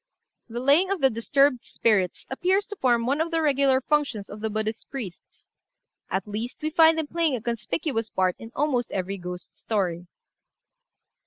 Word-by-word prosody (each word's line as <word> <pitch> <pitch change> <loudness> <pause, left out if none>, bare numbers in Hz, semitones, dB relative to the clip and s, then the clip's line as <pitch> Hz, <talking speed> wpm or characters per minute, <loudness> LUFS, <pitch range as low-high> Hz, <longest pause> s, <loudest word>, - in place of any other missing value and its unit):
The 235 +1 -4
laying 285 +9 +4
of 395 -5 -1
disturbed 275 +2 +2
spirits 195 -6 0
appears 375 +8 +1
to 415 - -7
form 240 -5 +2
one 280 +5 +1
of 330 - 0
the 330 -1 0
regular 275 -3 +3
functions 270 -8 -1
of 205 - -8
the 220 +1 -2
Buddhist 215 +1 -3
priests; 225 -10 -8 0.6
at 190 +1 -2
least, 225 +7 -5
we 310 - -1
find 320 0 +6
them 320 - 0
playing 320 -2 0
a - - -3
conspicuous 230 +1 -2
part 185 -1 +1
in 225 - -10
almost 265 -5 0
every 195 +1 -3
ghost 180 0 -8
story. 180 -5 -1
245 Hz, 165 wpm, -25 LUFS, 215-295 Hz, 0.6 s, find